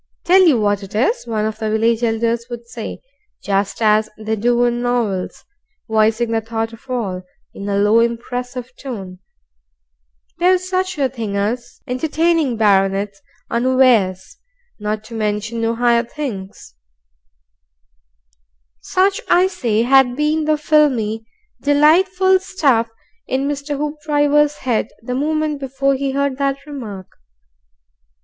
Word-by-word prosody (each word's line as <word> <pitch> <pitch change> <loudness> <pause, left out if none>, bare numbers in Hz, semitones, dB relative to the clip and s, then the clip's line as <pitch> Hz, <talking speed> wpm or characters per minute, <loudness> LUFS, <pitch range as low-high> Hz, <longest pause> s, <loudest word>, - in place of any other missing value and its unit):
"Tell 370 +2 +5
you 275 -8 +4
what 205 -1 +1
it 195 +1 -10
is," 255 - 0
one 215 -2 -1
of 220 0 -4
the 220 -1 -2
village 225 +1 +1
elders 230 0 0
would 235 -1 -7
say 235 -2 -7 0.4
just 200 +2 -1
as 215 0 +3
they 220 0 -2
do 240 +3 +2
in 240 0 +1
novels 235 -7 -2 0.4
voicing 220 +1 +2
the 225 0 +1
thought 225 0 -3
of 230 +3 -15
all, 205 -8 -2 0.3
in 200 +1 -6
a 200 - 0
low, 210 +3 +4
impressive 245 +2 -3
tone: 195 -9 -7 1.2
"There's 365 +1 +3
such 370 -1 -1
a 275 -2 +2
thin' 225 -6 -5
as 220 +5 -3
entertaining 310 0 0
barranets 200 -1 +1 0.3
unawares 235 -7 +2 0.4
not 210 +1 -3
to 230 - -12
mention 215 +1 -2
no 230 0 0
higher 235 0 +3
things 230 - -7 1.0
" - - -48
Such, 390 +2 +1
I 355 +1 +5
say, 230 - 0
had 260 0 +4
been 300 +2 0
the 310 0 +2
filmy, 250 -8 +1 0.3
delightful 365 +6 +4
stuff 275 -12 +1 0.4
in 265 +2 -1
Mr. 290 0 -3
Hoopdriver's 295 0 +1
head 240 -4 +1 0.2
the 250 - -4
moment 305 +2 -1
before 275 0 0
he 275 +1 -1
heard 275 0 -1
that 275 0 -1
remark. 225 -10 -7
235 Hz, 135 wpm, -19 LUFS, 215-285 Hz, 1.2 s, Tell